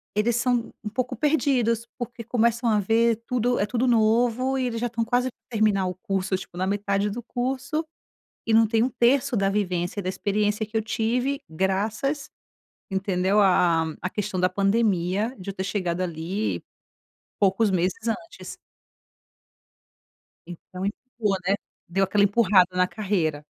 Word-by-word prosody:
eles 220 +2 +2
são 240 -1 0
um 210 - -3
pouco 250 +3 -2
perdidos, 255 -7 +1
porque 240 -1 -6
começam 235 +1 +1
a 215 -1 +3
ver 225 +3 +2
tudo 245 0 +1
é 200 - +2
tudo 245 +3 0
novo, 240 +3 +2
e 260 - 0
eles 230 -2 -2
já 245 - +1
estão 230 0 -2
quase 245 +2 +1 0.2
terminar 210 -4 +2
o 180 - -2
curso, 190 +1 -2
tipo, 175 - -11
na 185 - 0
metade 200 0 0
do 240 +3 -5
curso, 265 +6 -2 0.6
e 225 - +2
não 225 0 +6
tem 225 +1 +2
1/3 255 +2 +2
da 195 0 +2
vivência 185 -2 -1
e - - -3
da - - -4
experiência 210 +2 0
que 220 +1 -3
eu - - +2
tive, 245 +5 -1
graças 210 - -1 0.6
entendeu, 190 +1 +1
a 180 -4 +4
a 160 -1 -5
a 185 - -1
questão 205 -2 -3
da 185 - +4
pandemia, 200 +2 +1
de 190 +1 -7
eu - - -4
ter 190 - -3
chegado 185 -3 -2
ali, 180 +4 -2 0.8
poucos 200 +1 +3
meses 185 +5 -1
antes. 335 +8 -6 1.9
Então 180 +2 -8
empurrou, 210 -2 -2
né. 195 - +3 0.3
Deu 195 +3 +2
aquela 200 +1 +3
empurrada 200 -3 +4
na 180 0 +4
carreira. 180 -8 -1
210 Hz, 160 wpm, -25 LUFS, 190-235 Hz, 1.9 s, não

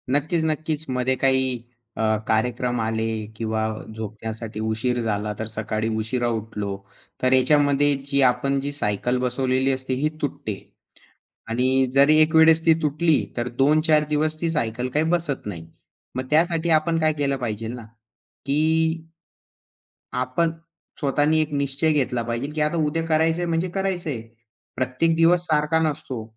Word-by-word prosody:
नक्कीच, 155 +5 +1
नक्कीच. 155 0 -2
मध्ये 130 0 0
काही 130 -2 +1 0.4
अ, - - -2 0.3
कार्यक्रम 125 +2 0
आले 110 0 -1 0.3
किंवा 110 -1 -1 0.3
झोपण्यासाठी 110 0 -6
उशीर 110 +3 -1
झाला 105 -1 -2
तर 110 - -3
सकाळी 110 0 -3
उशिरा 120 +3 -1
उठलो 105 -3 -3 0.4
तर 130 0 +3
याच्यामध्ये 145 +2 +3 0.2
जी 140 0 +3
आपण 130 +2 +2
जी 140 +1 -3
सायकल 125 -2 -1
बसवलेली 130 +1 +1
असते 130 0 -3
ही 140 +4 0
तुटते 140 -7 -3 0.9
आणि 130 +3 +2
जरी 140 +3 +5
एक 155 +1 +3
वेळेस 160 0 +6
ती 165 - +7
तुटली 155 +1 +2
तर 120 0 -1
2-4 155 +2 +4
दिवस 155 +1 0
ती 170 - 0
सायकल 125 -5 -1
काही 150 +2 +3
बसत 170 -9 -1
नाही. 85 -6 -6 0.5
मग 130 - -2
त्यासाठी 165 +1 +2
आपण 165 +1 -1
काय 155 0 +3
केलं 140 -1 +1
पाहिजे 115 -3 -4
ना 120 0 -7 0.6
की 140 +1 0 1.6
आपण 130 +7 0 0.5
स्वतःनी 145 +2 +2
एक 155 -1 -3
निश्चय 140 +2 +1
घेतला 130 -5 0
पाहिजे 120 +3 -3
की 155 - -2
आता 150 +3 +1
उद्या 165 +2 -1
करायचंय 160 +2 +2
म्हणजे 170 +2 -1
करायचंय. 175 - -2 0.5
प्रत्येक 130 +7 +1
दिवस 165 +2 +4
सारखा 155 0 +2
नसतो, 150 -7 -2
135 Hz, 145 wpm, -23 LUFS, 120-155 Hz, 1.6 s, ती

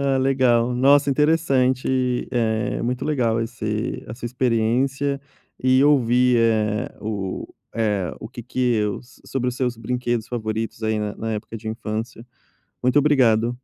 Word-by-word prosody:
Ah, 140 -1 +1
legal. 125 -3 +2
Nossa, 140 +3 +4
interessante, 130 -4 +1
eh, 110 -2 0
muito 125 +1 -2
legal 120 -7 +1
esse 110 -1 -3
a 110 - -7
sua 120 0 -6
experiência 130 +4 0 0.4
e 130 +1 +4
ouvir, 125 -3 +4
eh, 110 -2 +1
o 100 -3 -4 0.3
eh, 105 -6 -1
o 110 - -7
que 120 - -9
que - - -9 0.2
eus 105 +4 -3
sobre 125 -2 -1
os 125 - -4
seus 125 -3 -1
brinquedos 120 0 -2
favoritos, 110 -1 -3
aí, 110 0 0
na 105 -1 -3
na 115 0 -3
época 110 +1 -5
de 110 - -11
infância. 110 +1 -5 0.6
Muito 125 +2 +1
obrigado. 120 -6 +3
120 Hz, 145 wpm, -22 LUFS, 110-130 Hz, 0.6 s, Nossa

